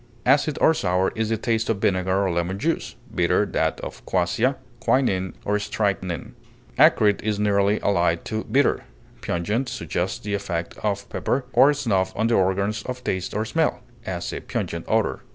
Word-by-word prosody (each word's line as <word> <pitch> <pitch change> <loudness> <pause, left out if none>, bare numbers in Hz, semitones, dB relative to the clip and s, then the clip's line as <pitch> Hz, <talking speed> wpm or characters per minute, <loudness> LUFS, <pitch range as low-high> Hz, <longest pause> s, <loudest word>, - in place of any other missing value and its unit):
Acid 145 +3 +3
or 160 - +5
sour 90 - +1
is 110 -1 -1
the 115 - +1
taste 115 0 -1
of 115 - +1
vinegar 95 0 +1
or 95 - 0
lemon 85 +3 -1
juice; 165 +10 -2 0.2
bitter - - +2
that - - -1
of - - -8
quassia, 95 +9 +1 0.2
quinine, 100 -8 +1
or 105 +1 +1
strychnine. 100 -4 -2 0.5
Acrid 105 -2 +5
is 105 -1 -1
nearly 100 0 +2
allied 85 -4 +1
to 110 0 -3
bitter. 140 +2 +2 0.4
Pungent 105 +9 -1
suggests - - -2
the 105 0 -5
effect 85 -4 -3
of 100 -1 -2
pepper 130 +1 -1
or 140 +2 +6
snuff 95 -9 0
on 110 - 0
the 115 - +2
organs 100 +3 +1
of 125 0 -6
taste 95 0 -2
or 110 +1 0
smell; 160 +7 0 0.2
as, 90 -4 -4
a - - -3
pungent - - -4
odor. - - +1
100 Hz, 170 wpm, -24 LUFS, 95-115 Hz, 0.5 s, or